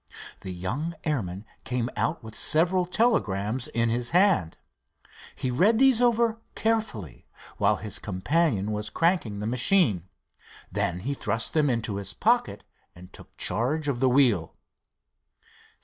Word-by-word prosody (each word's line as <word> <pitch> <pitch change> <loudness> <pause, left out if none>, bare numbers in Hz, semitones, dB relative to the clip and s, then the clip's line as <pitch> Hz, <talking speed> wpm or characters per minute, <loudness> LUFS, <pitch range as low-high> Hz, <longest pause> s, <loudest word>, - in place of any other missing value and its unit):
The 95 - -7
young 120 - -4
airman 105 - -3 0.2
came 125 -1 -1
out 155 -5 -1
with 110 -1 -9
several 175 +7 +2
telegrams 125 - 0
in 115 0 0
his 120 +1 0
hand. 180 - +2 0.8
He 130 - -2
read 200 - +3
these 260 -2 +5
over 235 -2 +2 0.2
carefully 215 - -2 0.3
while - - +3
his 105 -3 -3
companion 105 - 0
was 105 0 -3
cranking 165 - 0
the - - -3
machine. 120 - +2 0.6
Then 100 -3 -1
he 135 +8 -2
thrust 115 -4 -2
them 150 -3 +2
into 115 -4 -1
his 100 -2 -5
pocket - - +1 0.3
and 90 +1 -14
took - - -15
charge 145 +6 0
of 135 -4 -1
the 130 0 +3
wheel. 120 - +2
125 Hz, 135 wpm, -26 LUFS, 105-170 Hz, 0.8 s, these